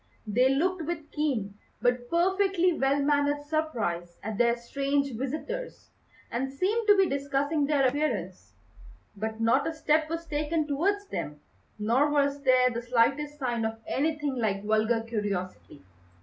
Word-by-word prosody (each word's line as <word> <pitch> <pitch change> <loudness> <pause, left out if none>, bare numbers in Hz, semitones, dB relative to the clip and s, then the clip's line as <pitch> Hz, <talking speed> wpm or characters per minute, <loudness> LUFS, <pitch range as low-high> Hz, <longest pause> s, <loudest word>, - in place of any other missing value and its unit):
They 245 +5 +3
looked 350 +7 +1
with 315 -3 -5
keen, 225 -10 -2 0.2
but 245 0 0
perfectly 370 +1 +2
well 275 -1 +1
mannered 290 0 +1
surprise 230 - -2
at 215 -1 -4
their 235 -1 +4
strange 275 +3 -1
visitors, 310 - -5 0.4
and 265 +3 -2
seemed 415 +11 0
to 410 -1 +7
be 385 -1 +4
discussing 280 +1 0
their 285 -3 +3
appearance; 250 - -2 0.6
but 220 +2 -4
not 235 +5 +3
a - - 0
step 310 0 +1
was 330 +1 -4
taken 305 +1 -1
towards 380 +8 0
them, 150 - -5 0.4
nor 235 +8 +2
was 285 -1 +1
there 255 -2 +4
the 235 0 -3
slightest 270 +5 +1
sign 240 -5 -1
of 225 0 -2
anything 295 -2 -1
like 205 -4 -1
vulgar 220 +2 +2
curiosity. 200 - -4
275 Hz, 145 wpm, -28 LUFS, 230-310 Hz, 0.6 s, to